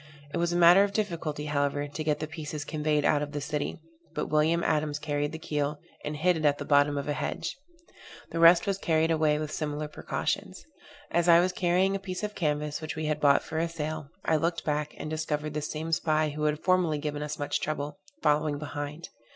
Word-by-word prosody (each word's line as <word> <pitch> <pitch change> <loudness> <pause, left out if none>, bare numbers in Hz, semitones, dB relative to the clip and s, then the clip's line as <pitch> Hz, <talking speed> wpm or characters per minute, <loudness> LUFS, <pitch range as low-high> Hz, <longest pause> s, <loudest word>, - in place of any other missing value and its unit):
It - - -1
was 170 0 +1
a - - -1
matter 175 +3 +7
of 200 0 -1
difficulty, 165 -8 -2
however, 145 0 0
to 150 +2 -5
get 150 -1 +1
the 155 - -2
pieces 155 -2 -6
conveyed 150 -1 0
out 145 - +3
of 145 0 -4
the 145 - -2
city; 150 0 -3 0.4
but - - -2
William 160 +3 +3
Adams 150 -1 +1
carried 145 0 -2
the 160 - -5
keel, 150 -2 -2 0.3
and 150 0 -4
hid 180 +3 +3
it 160 - -3
at 145 -1 +3
the - - -5
bottom 145 0 +4
of 140 - -3
a 145 - 0
hedge: - - -3 0.8
the 165 - -2
rest 170 +3 +7
was 195 -1 -1
carried 160 -2 +2
away 155 -2 +3
with 155 0 -4
similar 150 -1 -3
precautions. 150 - -3 0.5
As 170 0 +2
I 170 0 +8
was 180 +1 +2
carrying 180 +2 +2
a - - -2
piece 190 0 -5
of 210 0 -2
canvas, 150 -3 -1
which 155 0 -5
we 155 0 -3
had 150 -1 0
bought 140 -1 +5
for 160 - -3
a 165 +1 0
sail, 155 -2 -4 0.2
I 160 - +3
looked 170 +2 -1
back, 150 0 -1
and - - -5
discovered 155 -1 -2
the 150 - -2
same 155 +2 -4
spy, 155 -1 +2
who 150 +1 -3
had 150 0 0
formerly 180 -4 +3
given 145 0 -3
us 150 0 -4
much 145 - -1
trouble, 145 -1 -3 0.2
following 150 0 +2
behind. 145 +2 -6
155 Hz, 220 wpm, -28 LUFS, 150-165 Hz, 0.8 s, I